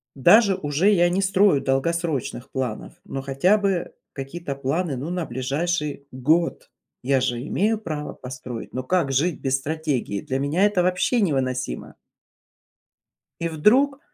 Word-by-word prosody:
даже 200 - +6
уже 160 +3 +1
я 175 -3 +4
не 190 +2 0
строю 190 -5 +3
долгосрочных 135 -2 -1
планов, 130 -2 -4
но 135 -9 -5
хотя 140 +10 +2
бы 195 -4 -1 0.2
какие-то 140 +2 -5
планы, 140 +3 -1
ну, 145 +7 -4
на 180 -2 -2
ближайший 145 +2 -2
год, 155 +7 0 0.3
я 135 +1 +2
же 120 -2 -1
имею 215 +5 +1
право 155 -7 -5
построить, 125 -2 -8
но 130 - -3
как 165 -1 +1
жить 150 +5 +1
без 135 0 +1
стратегии? 145 -8 -2
Для 130 0 -3
меня 145 +7 +1
это 205 -4 +2
вообще 185 +7 +1
невыносимо! 130 - -2 1.5
И 170 - 0
вдруг 255 - +3
150 Hz, 140 wpm, -23 LUFS, 135-180 Hz, 1.5 s, даже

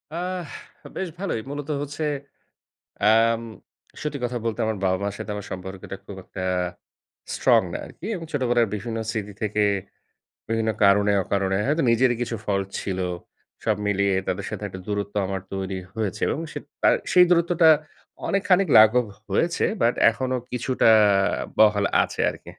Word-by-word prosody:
আহ 180 0 -3 0.5
বেশ 190 - -2
ভালোই। 190 - -2
মূলত 145 +1 -6
হচ্ছে 145 +2 -5 1.0
অ্যাম 115 +1 +4 0.6
সত্যি 150 -2 -3
কথা 120 0 -1
বলতে, 115 0 -2
আমার 110 -1 -1
বাবা-মার 95 +2 0
সাথে - - -5
আমার 105 -1 -6
সম্পর্কটা 95 +1 -7
খুব 100 - -8
একটা 95 - -6 0.9
স্ট্রং - - +4
না - - -2
আরকি। - - -11
এবং 165 -3 -6
ছোটবেলার 120 -4 +2
বিভিন্ন 115 +2 -4
স্মৃতি 105 -2 -4
থেকে 105 -1 +1 0.9
বিভিন্ন 115 0 0
কারণে, 100 +1 +5
অকারণে 95 0 0
হয়তো 155 +3 +1
নিজেরই 120 +1 +3
কিছু 120 -1 -2
ফল্ট 100 -1 -1
ছিল। 95 -1 -3 0.6
সব 110 -2 +2
মিলিয়ে 100 -1 +2
তাদের - - -2
সাথে - - -6
একটা 95 - -8
দূরত্ব 100 -1 -3
আমার 95 -1 -3
তৈরি 95 0 -3 0.2
হয়েছে, 110 -4 -3
এবং - - -1
সেইত 145 - -7 0.2
তা - - +5 0.2
সেই 180 0 +7
দূরত্বটা 170 -1 +4 0.6
অনেকখানিক 195 -1 +2
লাঘব 110 +3 +6 0.2
হয়েছে। 165 - +1 0.2
বাট 120 - +4 0.2
এখনো 130 +3 -2 0.2
কিছুটা 125 -1 +2 0.7
বহাল 105 -2 +5 0.2
আছে - - -4
আরকি। - - -10
110 Hz, 145 wpm, -24 LUFS, 100-145 Hz, 1.0 s, সেই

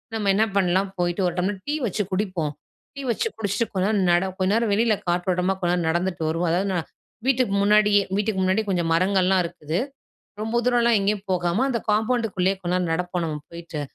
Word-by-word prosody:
நம்ம 210 -2 0
என்ன 215 +2 +4
பண்லாம், 190 +1 +2
போயிட்டு 175 +2 0
ஒரு 175 - -3
டம்ளர் 190 +2 -1
டீ 295 - 0
வச்சு 210 -1 -1
குடிப்போம். 185 -6 -1 0.4
டீ 280 - -6
வச்சு 445 - -1
குடிச்சிட்டு 205 +1 -1
கொஞ்சம் 195 +3 +1
நேரம் 195 -3 +2
நட 175 +2 +3
கொஞ்ச 185 +1 +2
நேரம் 230 -1 +1
வெளியில 220 +1 +3
காற்றோட்டமா 180 +1 +1
கொஞ்ச 175 -1 +1
நேரம் 170 -2 -1
நடந்துட்டு 175 0 -1
வருவோம் 165 +2 0
அதாவது 185 +4 +1
நா 180 - 0 0.5
வீட்டுக்கு 255 -6 +2
முன்னாடியே 210 0 +4 0.2
வீட்டுக்கு 210 -1 0
முன்னாடி 190 +3 +2
கொஞ்சம் 175 -3 0
மரங்கள்லாம் 185 +1 +3
இருக்குது. 165 -1 -4 0.6
ரொம்ப 225 +2 0
தூரன்லாம் 240 -2 +3
எங்கேயும் 200 0 0
போகாம, 180 +5 +1
அந்த 235 - 0
காம்பவுண்டுக்குள்ளயே 215 -4 +1
கொஞ்ச 175 - -2
நேரம் 180 -2 0
நடப்போம் 180 +1 -2
நம்ம 155 -2 -3
போயிட்டு. 170 -2 -7
190 Hz, 185 wpm, -24 LUFS, 175-210 Hz, 0.6 s, என்ன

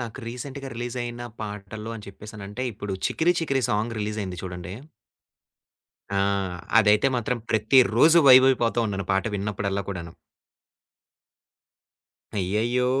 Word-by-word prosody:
నాకు 120 0 -6
రీసెంట్‌గా 135 +3 -7
రిలీజయిన 120 0 -4 0.2
పాటలు 105 +1 -6
అని 105 - -11
చెప్పేసి 105 +2 -11
అంటే 120 +5 -5
ఇప్పుడు 105 -1 -6
'చికిరి 170 +2 +2
చికిరి' 135 -7 0
సాంగ్ 110 +2 -1
రిలీజయింది 105 -4 -4
చూడండి. 90 0 -6 1.4
ఆ! - - 0 0.6
అదైతే 105 +3 +4
మాత్రం 120 +1 -1
ప్రతిరోజు 125 +7 +5
వైబ్ 130 0 +9
అయిపోతున్నాను 115 -6 0
పాట 95 - +1
విన్నప్పుడల్లా 100 0 -2
కూడాను. 85 -4 -6 2.2
అయ్యయ్యో! 115 +7 0
110 Hz, 105 wpm, -25 LUFS, 100-125 Hz, 2.2 s, వైబ్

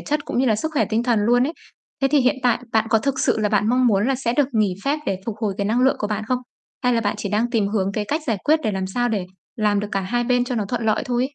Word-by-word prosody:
chất, 300 0 -2
cũng - - -3
như 260 - +2
là 215 -3 +3
sức 315 +8 -3
khỏe 300 - +2
tinh 225 +1 0
thần 240 -3 +2
luôn 245 +4 +3
ấy. 315 - -3 0.5
Thế 270 - +4
thì 295 - +4
hiện 255 +2 +2
tại, 245 -1 +3
bạn 220 0 +2
có 225 0 +4
thực 270 +3 -2
sự - - +2
là 210 -1 +1
bạn 210 0 +1
mong 250 +1 +3
muốn 210 0 +2
là 270 - +2
sẽ 245 -2 -1
được 265 +1 +2
nghỉ 210 -5 +1
phép 285 +2 +1
để 190 -1 -1
phục 220 - -3
hồi 210 -3 -1
cái 200 - 0
năng 230 +4 +1
lượng 265 +1 +3
của 210 - -1
bạn 215 0 -3
không? 250 +2 0 0.5
Hay 250 -1 +3
là 230 - +2
bạn 205 -2 -1
chỉ 205 - -3
đang 220 +4 0
tìm 220 -5 +1
hướng, 200 -2 -1
cái 210 - -2
cách 300 +9 -1
giải 220 -3 0
quyết 310 +1 +3
để 215 - 0
làm 190 -1 -2
sao 245 +6 -1
để 200 -5 -2 0.3
làm 210 -2 +1
được 205 - -4
cả 195 - +1
hai 240 +6 -1
bên 245 0 +2
cho 250 - -3
nó 220 -3 -1
thuận 230 +2 -3
lợi 215 0 +2
thôi 245 -1 0
ấy? 275 +2 -3
230 Hz, 330 wpm, -22 LUFS, 210-250 Hz, 0.5 s, Thế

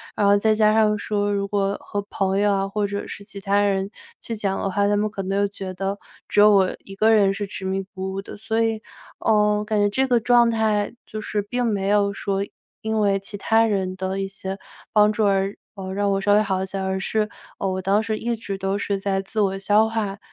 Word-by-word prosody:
然 205 - +1
后 200 0 +6
再 215 +2 +3
加 215 0 +4
上 215 -1 +3
说， 205 0 -1
如 200 -1 -1
果 200 0 0
和 205 - -4
朋 195 0 0
友 205 0 +3
啊， 195 0 0
或 205 +1 -1
者 200 0 -4
是 200 - -8
其 200 -1 -10
他 200 +1 +1
人 195 -1 +1 0.4
去 230 - -4
讲 200 -2 -1
的 - - -1
话， 200 +1 +2
他 205 0 +2
们 210 +1 +1
可 200 - -4
能 195 +1 -1
又 200 0 +2
觉 195 -1 -7
得， 195 +2 -3 0.3
只 - - +1
有 210 +1 +8
我 195 -3 +3
一 195 - -11
个 215 +2 +4
人 205 -3 +5
是 205 +1 -3
执 195 - -8
迷 190 +1 -1
不 190 -1 -4
悟 195 +1 -4
的。 - - -9
所 225 +1 -2
以， 225 -1 -1 0.4
呃， 210 -1 +2
感 215 - 0
觉 205 - +4
这 260 +6 +1
个 245 -2 +3
状 240 0 +4
态 215 -2 +1
就 215 - -6
是 210 -1 -2
并 245 +5 -2
没 205 -4 0
有 205 -1 +3
说， 195 0 -2 0.4
因 220 0 -1
为 200 -1 +2
其 200 +1 -7
他 225 +3 +3
人 190 -3 -1
的 190 +1 -3
一 195 - -1
些 195 0 -6 0.3
帮 210 0 +5
助 215 0 +1
而， 195 0 +1 0.2
呃， 190 -1 -6
让 200 0 +1
我 195 0 0
稍 205 +1 +3
微 210 - +5
好 190 -2 -1
一 - - -1
些， 195 - -5
而 190 0 -1
是， 210 +3 0 0.3
呃， 195 - -2
我 185 0 -2
当 195 +3 +2
时 220 0 -1
一 235 +1 -2
直 205 -3 -5
都 195 +1 -1
是 200 -1 -2
在 195 0 0
自 195 +3 -5
我 195 -1 +1
消 205 +3 +3
化 210 -3 -3
205 Hz, 265 characters per minute, -23 LUFS, 195-215 Hz, 0.4 s, 有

